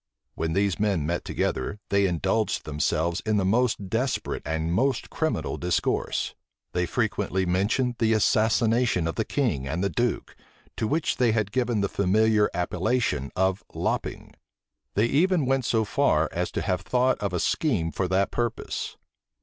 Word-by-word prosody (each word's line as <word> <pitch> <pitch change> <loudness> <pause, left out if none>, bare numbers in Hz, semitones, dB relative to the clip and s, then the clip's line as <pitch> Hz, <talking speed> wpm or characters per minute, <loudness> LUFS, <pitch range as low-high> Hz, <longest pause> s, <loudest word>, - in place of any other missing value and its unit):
When 80 0 -2
these 100 0 +1
men 100 -7 +1
met 85 +2 -1
together, 100 +11 -2
they 100 0 +3
indulged 95 +5 0
themselves 80 +4 0
in 110 -1 +1
the 95 - +1
most 110 -1 +1
desperate 115 +5 -1
and 80 +2 -1
most 130 +5 0
criminal 160 -1 -1
discourse; 90 -2 -1 0.4
they 90 0 0
frequently 95 +2 0
mentioned 105 +7 +1
the 115 -1 +3
assassination 110 -2 +2
of 80 - -1
the 110 - -1
king 105 - -1
and 85 +7 -2
the 100 - 0
duke, - - -1 0.4
to 110 - -1
which 155 +6 0
they 120 -3 +3
had 110 -3 0
given 120 -3 0
the 100 - +1
familiar 105 +3 +2
appellation 90 - -1
of 95 +1 +1
lopping: - - -3 0.6
they 105 - +3
even 165 +5 +2
went 135 -1 +1
so 110 -2 +1
far - - +2
as - - -2
to - - -2
have 90 -1 0
thought 125 +5 +1
of 100 -2 -2
a 90 - -1
scheme 100 - 0
for 95 +5 -1
that 95 +2 +1
purpose. 120 -2 -3
100 Hz, 160 wpm, -26 LUFS, 90-120 Hz, 0.6 s, they